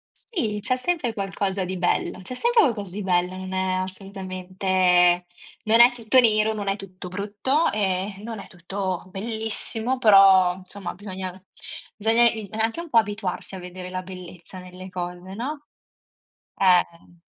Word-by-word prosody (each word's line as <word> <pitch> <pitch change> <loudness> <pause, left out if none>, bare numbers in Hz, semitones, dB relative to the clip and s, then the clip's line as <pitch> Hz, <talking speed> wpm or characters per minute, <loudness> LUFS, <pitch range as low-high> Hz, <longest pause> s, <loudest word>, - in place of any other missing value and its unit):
Sì, 220 - -3
c'è 255 +3 +1
sempre 255 -4 0
qualcosa 195 -1 -2
di 185 +1 -4
bello, 180 +1 0
c'è 220 +7 -5
sempre 475 - +4
qualcosa 205 - -1
di 205 +1 -5
bello, 180 0 0
non 185 0 -6
è 185 0 0
assolutamente 185 -2 +1 0.4
non 225 +1 +4
è 240 +1 +9
tutto 240 +2 +3
nero, 220 -2 +4
non 205 -2 -5
è 195 - +1
tutto 185 -2 -9
brutto 205 - 0
e 195 -1 -1
non 225 -2 -6
è - - -10
tutto 185 0 -4
bellissimo, 220 +4 -2
però 195 -5 +6
insomma 185 0 -7
bisogna 190 -2 -7 0.5
bisogna 225 +3 +3
il 215 -4 -7
anche 225 +8 -1
un 340 - -10
po' 235 - +3
abituarsi 205 -2 -1
a - - -7
vedere 180 0 -8
la 185 0 -4
bellezza 180 0 -9
nelle 180 +1 -10
cose, 180 +1 -6
no? 290 +5 -5 0.9
Eh. 175 -2 +1
195 Hz, 150 wpm, -24 LUFS, 185-220 Hz, 0.9 s, è